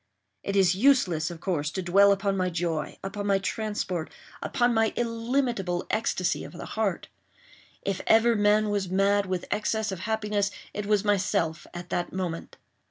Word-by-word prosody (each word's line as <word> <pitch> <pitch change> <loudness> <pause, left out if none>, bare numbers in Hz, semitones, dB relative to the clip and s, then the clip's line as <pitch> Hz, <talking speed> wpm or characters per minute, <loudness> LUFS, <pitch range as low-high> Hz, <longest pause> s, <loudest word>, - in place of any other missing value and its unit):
It 200 - -3
is 190 -2 +5
useless, 185 - +3
of 170 -2 -8
course, 155 -6 -1
to 190 +3 -4
dwell 200 +3 +5
upon 200 0 +1
my 185 -1 0
joy—upon 175 +4 -3
my 200 -1 +4
transport—upon 210 +3 -2
my 225 -1 +2
illimitable 230 -6 -1
ecstasy 185 -5 0
of - - -10
heart. 200 +1 -3 0.8
If 195 -2 -2
ever 225 +1 +5
man 210 0 +3
was 200 -3 -1
mad 200 +1 +2
with 185 -1 -2
excess 215 0 0
of 190 - -5
happiness, 210 0 0 0.2
it 210 -1 -4
was 210 -1 +2
myself 190 -6 0
at 175 0 -8
that 175 - -1
moment. 180 -3 -4
200 Hz, 150 wpm, -27 LUFS, 180-215 Hz, 0.8 s, is